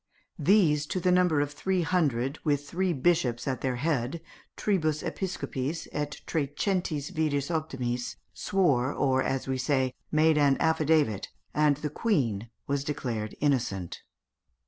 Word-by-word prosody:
These, 155 -4 +4
to 185 - -2
the 180 +1 +2
number 180 -5 +4
of 145 0 -1
three 185 +4 0
hundred, 145 -6 0
with 145 -1 0
three 185 +3 0
bishops 130 -6 +1
at 130 -2 -1
their 130 -2 0
head 140 +1 -1 0.4
(tribus 160 -7 0
episcopis 155 -5 -3
et 150 0 -4
trecentis 155 +1 -1
viris 150 -4 0
optimis), 125 -7 -2 0.2
swore, 145 -10 +1
or, 130 -2 +1
as 135 0 -1
we 130 -1 -1
say, 130 -1 +1 0.2
made 155 0 +4
an 140 -2 +4
affidavit, 155 - +2 0.3
and 150 -2 +3
the 150 -1 -4
queen 120 - 0 0.2
was 140 0 -1
declared 120 -7 -3
innocent. 115 - 0
145 Hz, 135 wpm, -28 LUFS, 130-160 Hz, 0.4 s, These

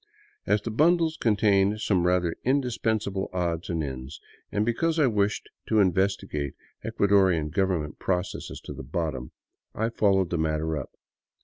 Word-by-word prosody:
As 105 - +2
the 115 - -3
bundles 160 +5 +3
contained 105 -3 +2
some 90 -5 +1
rather 90 -2 +1
indispens 120 -5 0
able 95 -1 -3
odds 85 -2 -2
and 85 -3 -1
ends, 65 +1 -6 0.3
and 105 +1 +1
because 160 +8 0
I 155 - +4
wished 105 -4 0 0.2
to 110 - +2
investigate 95 -6 0 0.3
Ecuadorian 95 -6 +2
government 90 -5 -1
processes 90 0 -2
to - - -8
the - - -8
bottom, 75 -1 -3 0.5
I 110 +1 0
followed 95 -5 +2
the 85 - 0
matter 80 0 0
up. 70 -3 -5
95 Hz, 145 wpm, -26 LUFS, 80-110 Hz, 0.5 s, I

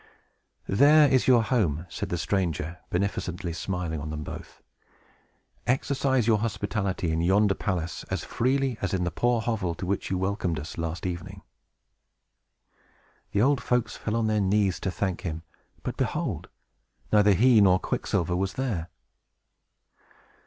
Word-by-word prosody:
"There 145 +8 +6
is 130 -2 +2
your 120 -3 +6
home," 90 - 0
said - - -5
the 90 - -1
stranger, 85 -2 -1
beneficently 90 -2 -2
smiling 85 -2 -3
on 75 - -5
them 75 0 -4
both. - - -9 1.1
"Exercise 130 -1 +1
your 110 -2 +3
hospitality 100 -5 -2
in 80 +1 0
yonder 100 +3 +3
palace 90 -4 -3
as - - -2
freely 130 -1 0
as 95 -1 0
in 90 - 0
the 90 - -1
poor 120 +7 +1
hovel 105 -7 -1
to 90 - -5
which 100 +2 -2
you 95 - 0
welcomed 95 -3 -1
us 80 +3 -7
last 85 +2 -3
evening." 85 -2 -5 1.9
The 100 - +2
old 140 -1 +3
folks 125 -2 0
fell 105 - -3
on 115 -1 +1
their 110 -1 +1
knees 100 -1 +2
to - - -2
thank 95 -1 -2
him; 80 -3 -4 0.4
but, - - -4
behold! - - -2 0.6
neither 105 -1 +6
he 115 +2 +5
nor 95 -2 +6
Quicksilver 90 -1 -1
was 95 +1 -1
there. 105 -11 -2
95 Hz, 145 wpm, -27 LUFS, 85-115 Hz, 1.9 s, There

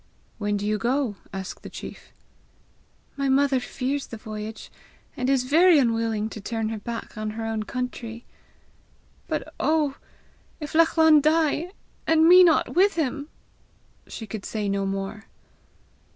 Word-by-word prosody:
"When 205 -1 0
do 205 - -4
you 210 0 0
go?" 245 -2 0
asked 190 -1 -6
the - - -9
chief. - - -10 1.1
"My 275 -1 0
mother 270 0 +3
fears 270 +3 -3
the 230 - -8
voyage, 215 0 -7 0.4
and 255 +1 -1
is 270 -2 +3
very 325 +6 +5
unwilling 225 -4 +1
to 215 - -8
turn 225 +1 -2
her 220 -1 -4
back 230 0 -6
on 215 0 -2
her 225 - -3
own 225 -1 -2
country. 235 0 -5 1.0
But - - -4
oh, 305 -3 +1 0.6
if 300 -2 -6
Lachlan 320 -1 +5
die, 315 +3 +1 0.3
and 320 0 +5
me 365 +1 +9
not 330 -3 +3
with 390 +2 +4
him!" 290 -2 -2 0.8
She 225 - -7
could 210 -1 -7
say 210 -2 -3
no 195 0 0
more. 195 +3 -4
245 Hz, 145 wpm, -25 LUFS, 215-300 Hz, 1.1 s, me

